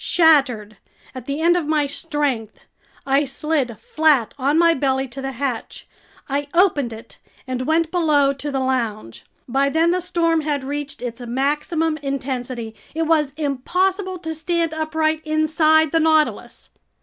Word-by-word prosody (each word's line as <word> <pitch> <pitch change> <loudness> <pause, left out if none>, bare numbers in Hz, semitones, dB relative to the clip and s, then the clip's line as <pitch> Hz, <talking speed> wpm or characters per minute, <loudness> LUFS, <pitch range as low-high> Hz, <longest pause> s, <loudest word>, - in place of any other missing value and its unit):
Shattered, 265 - +3 0.4
at 255 -2 -9
the 285 +2 -3
end 345 +2 +4
of 340 -4 -1
my 305 -1 +2
strength, 285 -7 -3 0.4
I 275 +1 +3
slid 275 -4 -2
flat 300 -7 +2
on 285 +3 +1
my 335 0 +5
belly 265 -2 0
to 270 +3 -8
the 270 0 -4
hatch. 255 -2 -4 0.4
I 280 +1 -2
opened 320 -9 +3
it 225 0 -12 0.3
and 255 -1 -3
went 320 +1 +1
below 300 -6 +3
to 280 +2 -5
the 275 -1 -1
lounge. 230 - -2 0.2
By 270 +3 +1
then 325 +3 +2
the 365 +1 0
storm 335 -2 +1
had 295 -2 -2
reached 285 -1 -5
its 245 0 -5
maximum 295 +6 -1
intensity. 255 -5 -4 0.2
It 325 - 0
was 305 -4 +1
impossible 365 +7 -1
to 320 -2 -5
stand 330 +1 -1
upright 315 0 -1
inside 310 0 +3
the 330 - +3
Nautilus. 315 -1 0
290 Hz, 150 wpm, -21 LUFS, 265-320 Hz, 0.4 s, my